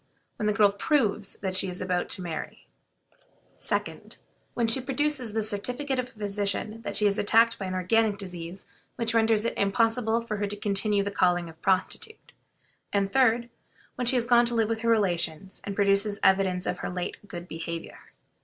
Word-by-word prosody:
When 210 - -1
the 210 - +2
girl 205 -1 +5
proves 210 -3 0
that 190 -1 -2
she 190 - +1
is 180 - -5
about 180 -1 -1
to 185 - -3
marry; 165 -2 -6 0.9
2d. - - -3 0.4
When 235 - +1
she 225 +4 +4
produces 270 -3 -1
the 220 0 0
certificate 250 +6 -1
of 250 - -2
a - - -19
physician 205 +1 -3
that 200 -2 -4
she 210 - +2
is 200 -1 +2
attacked 230 +2 +4
by 195 - -3
an 185 - -3
organic 205 +3 +2
disease 180 -1 -7 0.3
which 230 -1 -1
renders 225 -1 +3
it - - 0
impossible 225 +2 +2
for 215 -2 -4
her 205 0 -1
to 205 - -2
continue 205 0 +1
the 200 - -3
calling 175 -3 +1
of 160 - -12
a - - -37
prostitute; 315 - -1 0.6
and, 200 -1 0
3d. 240 -2 +3 0.4
When 250 -3 -3
she 255 - +4
has 240 -2 +2
gone 240 0 +5
to 240 - -1
live 225 -1 +2
with 225 -1 -1
her 230 +1 0
relations, 185 -4 0
and 200 - -4
produces 200 +1 +2
evidence 190 -1 +3
of 180 - -2
her - - -3
late 180 0 -4
good 175 -2 -8
behavior. 165 0 -6
205 Hz, 190 wpm, -27 LUFS, 190-230 Hz, 0.9 s, girl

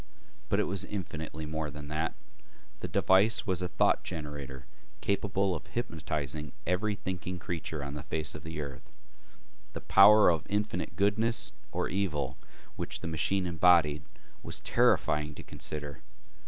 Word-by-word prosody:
But - - +2
it - - +4
was 95 -2 +1
infinitely 80 -5 -5
more 80 0 -3
than 75 0 -8
that. 80 +1 -1 0.6
The - - -4
device 100 +6 +4
was 95 -4 +1
a 90 - 0
thought 90 - +2
generator 75 -5 -6 0.3
capable 100 -1 +1
of 80 - -6
hypnotizing 75 - -3
every 100 +4 +1
thinking 90 -1 -4
creature 80 -4 -4
on 70 0 -5
the 75 - -5
face 75 +1 -2
of 80 - -7
the 80 -1 -5
earth. 70 -2 -8 0.8
The - - -5
power 105 +1 +8
of 80 -2 0
infinite 105 +1 -1
goodness 110 +3 +2 0.2
or - - -1
evil 80 -9 -1 0.4
which - - -3
the - - -4
machine 90 +4 +1
embodied 85 -4 +4 0.4
was - - -3
terrifying 75 0 +2
to - - -9
consider. 75 -2 -5
80 Hz, 145 wpm, -30 LUFS, 75-100 Hz, 0.8 s, power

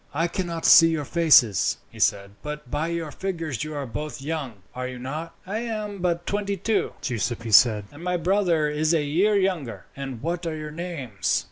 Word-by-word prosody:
"I 165 +3 +2
cannot 170 -3 -3
see 165 - +9
your 160 -3 -1
faces," 145 - +4
he - - -13
said; 100 0 +1
"but 150 -4 -7
by 150 +3 -1
your 170 -2 -3
figures 165 - -3
you 155 0 -6
are 140 -1 -3
both 150 +6 -5
young, 135 - -5
are 125 0 -4
you 130 0 -7
not?" 150 +7 -6
"I 205 +4 -3
am 215 -4 -4
but 175 -1 -1
twenty 200 -1 -1
two," 210 +3 0
Giuseppi 115 -1 -2
said, 105 0 +6
"and 145 +4 -12
my 180 0 0
brother 175 -3 +2
is 155 +2 +1
a 155 - +1
year 180 +9 +2
younger." 185 - -1
"And 135 -4 -6
what 170 +1 -2
are 160 - -2
your 155 -1 -6
names?" 150 - -2
155 Hz, 195 wpm, -25 LUFS, 135-175 Hz, -, see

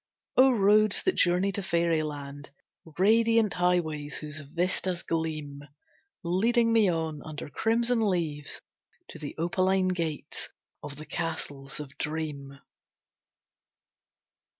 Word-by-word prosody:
O 265 +1 +7
Roads 215 -2 +4
that 375 - +3
journey 180 +3 +3
to 200 - -3
fairyland! 155 -5 -1 0.5
Radiant 225 +1 +4
highways 165 -5 0
whose 150 0 -4
vistas 175 +4 -2
gleam, 155 -3 -3 0.6
Leading 230 +7 +2
me 220 -4 +5
on, 160 -3 -2
under 150 -2 -7
crimson 230 +1 +1
leaves, 155 -5 -2 0.5
To 160 - -10
the 150 -2 -6
opaline 185 +3 +1
gates 165 -4 -3 0.3
of 145 -1 -7
the 155 +2 -9
Castles 150 -5 -4
of 145 -1 -8
Dream. 150 -3 -4
170 Hz, 105 wpm, -28 LUFS, 150-195 Hz, 0.6 s, O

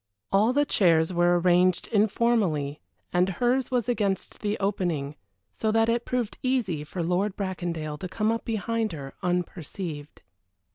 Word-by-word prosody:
All 210 +5 +4
the 290 +3 +2
chairs 170 - +3
were 175 0 +3
arranged 180 0 +3
informally, 205 -9 +1 0.3
and 180 +1 +3
hers 245 +6 +1
was 250 -2 0
against 205 -5 -1
the 210 0 -1
opening, 175 -8 -1 0.4
so 220 - 0
that 225 +1 +3
it 235 +1 0
proved 245 -4 -2
easy 230 - 0
for 170 +3 -4
Lord 185 +4 0
Bracondale 170 -6 -3
to 185 - -5
come 215 +3 0
up 230 - -2
behind 225 -1 -1
her 140 -3 -7
unperceived. 175 -3 -4
190 Hz, 145 wpm, -26 LUFS, 170-225 Hz, 0.4 s, All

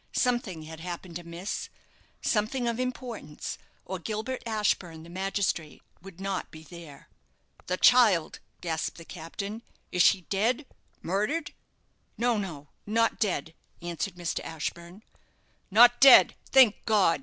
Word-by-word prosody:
Something 240 -10 0
had 160 0 -10
happened 175 0 -6
amiss 170 +3 -5 0.5
something 240 +3 0
of 235 0 -1
importance 250 - -5 0.3
or 190 0 -5
Gilbert 220 +7 -4
Ashburne, 190 -7 -1
the 170 - -12
magistrate, 190 -4 -2 0.2
would 190 -1 -13
not 195 -1 -3
be 155 0 -12
there. 160 -4 -12 0.6
"The 180 - -1
child!" 215 -11 +5 0.2
gasped 160 -2 -3
the 165 - -11
captain; 200 +7 -7 0.3
"is 180 - +2
she 190 +2 +5
dead 225 - 0 0.4
murdered?" 210 - -1 0.6
"No, 240 0 +2
no, 155 -8 -6 0.2
not 230 +2 +1
dead," 175 -7 -1 0.3
answered 175 +2 -4
Mr. 175 -1 -3
Ashburne. 170 +5 -6 0.7
"Not 240 +4 +7
dead! 270 0 +9 0.2
Thank 255 -6 +6
God!" 200 -8 +3
195 Hz, 125 wpm, -28 LUFS, 170-225 Hz, 0.7 s, dead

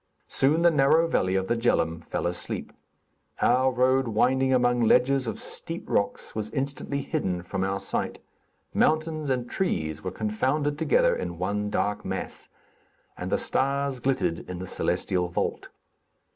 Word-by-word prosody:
Soon 150 +5 +2
the 170 - +6
narrow 155 +3 +4
valley 95 - +1
of 95 0 +1
the 120 - 0
Djeloum 80 -8 +1
fell - - -3
asleep. 90 0 -3 0.7
Our 130 +2 +3
road 130 +1 +2
winding 130 +4 +2
along 125 -1 +3
ledges 125 +3 +3
of 110 - -3
steep - - -6
rocks, - - -1
was 110 -1 -3
instantly 140 0 -3
hidden 90 -2 -2
from 95 +1 -3
our 95 0 -1
sight; 95 - -2 0.6
mountains 155 -1 +1
and 125 -2 0
trees 80 - -2
were 95 - -2
confounded 130 - -1
together 160 -3 +3
in 85 -1 -4
one 105 +3 -1
dark 105 0 -1
mass, - - -5 0.7
and - - -5
the - - +3
stars 140 0 0
glittered 125 -10 0
in 90 - -4
the 90 - -5
celestial 90 0 -1
vault. 85 - -2
125 Hz, 150 wpm, -26 LUFS, 95-140 Hz, 0.7 s, the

